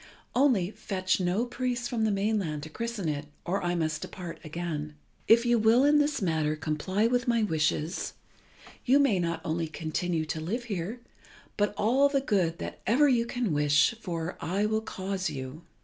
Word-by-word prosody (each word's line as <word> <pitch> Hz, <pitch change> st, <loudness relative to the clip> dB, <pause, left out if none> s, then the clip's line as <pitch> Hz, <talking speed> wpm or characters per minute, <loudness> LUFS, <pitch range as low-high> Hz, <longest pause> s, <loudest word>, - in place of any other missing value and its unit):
Only, 240 Hz, -9 st, +3 dB
fetch 190 Hz, -3 st, -1 dB
no 185 Hz, +6 st, +1 dB
priest 245 Hz, 0 st, -2 dB
from 230 Hz, -2 st, 0 dB
the 215 Hz, -, +2 dB
mainland 195 Hz, -7 st, -1 dB
to 155 Hz, -, -7 dB
christen 230 Hz, -2 st, -3 dB
it, 150 Hz, -1 st, -2 dB, 0.2 s
or 190 Hz, +3 st, -1 dB
I 175 Hz, 0 st, 0 dB
must 155 Hz, -2 st, -1 dB
depart 175 Hz, -3 st, -7 dB
again. 155 Hz, -2 st, -4 dB, 0.3 s
If 235 Hz, +2 st, +6 dB
you 240 Hz, -1 st, +3 dB
will 225 Hz, +5 st, +5 dB
in 295 Hz, +1 st, +5 dB
this 290 Hz, -6 st, +1 dB
matter 155 Hz, -3 st, +1 dB
comply 160 Hz, +7 st, -1 dB
with 245 Hz, +1 st, +1 dB
my 235 Hz, -2 st, +3 dB
wishes, 160 Hz, -2 st, -1 dB, 0.7 s
you 260 Hz, +3 st, +5 dB
may 275 Hz, -10 st, +3 dB
not 170 Hz, -1 st, -1 dB
only 165 Hz, +1 st, -1 dB
continue 160 Hz, +1 st, -2 dB
to 155 Hz, 0 st, -4 dB
live 220 Hz, +10 st, -2 dB
here, 210 Hz, +1 st, -4 dB, 0.5 s
but 205 Hz, 0 st, 0 dB
all 260 Hz, +7 st, +4 dB
the 280 Hz, -1 st, +2 dB
good 185 Hz, -10 st, 0 dB
that -, -, -7 dB
ever 270 Hz, +8 st, +5 dB
you 235 Hz, -3 st, +2 dB
can 240 Hz, -8 st, -1 dB
wish 145 Hz, +5 st, +4 dB
for 170 Hz, -3 st, -4 dB
I 195 Hz, +5 st, 0 dB
will 220 Hz, +1 st, +1 dB
cause 190 Hz, -3 st, -3 dB
you. 135 Hz, +1 st, -6 dB
190 Hz, 180 wpm, -28 LUFS, 160-235 Hz, 0.7 s, If